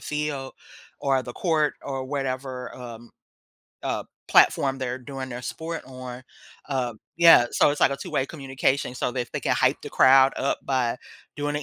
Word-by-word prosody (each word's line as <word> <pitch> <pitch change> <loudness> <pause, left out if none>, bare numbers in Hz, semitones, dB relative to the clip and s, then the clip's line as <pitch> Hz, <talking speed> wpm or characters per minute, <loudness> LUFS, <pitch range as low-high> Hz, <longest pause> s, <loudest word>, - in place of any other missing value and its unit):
field 150 -3 -3 0.5
or 135 -1 +2
the 120 - -8
court 155 -1 +1
or 135 -1 -4
whatever, 130 -2 -4
um, 120 -2 -10 0.7
uh, - - -2 0.2
platform 135 -1 +4
they're 130 -1 -3
doing 135 0 -7
their 125 +1 -6
sport 165 +4 -5
on. 130 -1 -8 0.5
Uh, 125 -4 -1 0.2
yeah, 165 -7 +8
so - - +4
it's 145 - -3
like - - +5
a 140 - -2
2 - - -8
way 135 - +1
communication 135 -3 -1
so 125 -1 -2
they 130 - -2
f 120 - -12
they - - -3
can - - +1
hype - - +2
the - - -7
crowd 135 0 +6
up 140 - 0
by 125 -3 0 0.4
doing 145 0 -2
an 150 - -3
135 Hz, 180 wpm, -25 LUFS, 125-140 Hz, 0.7 s, yeah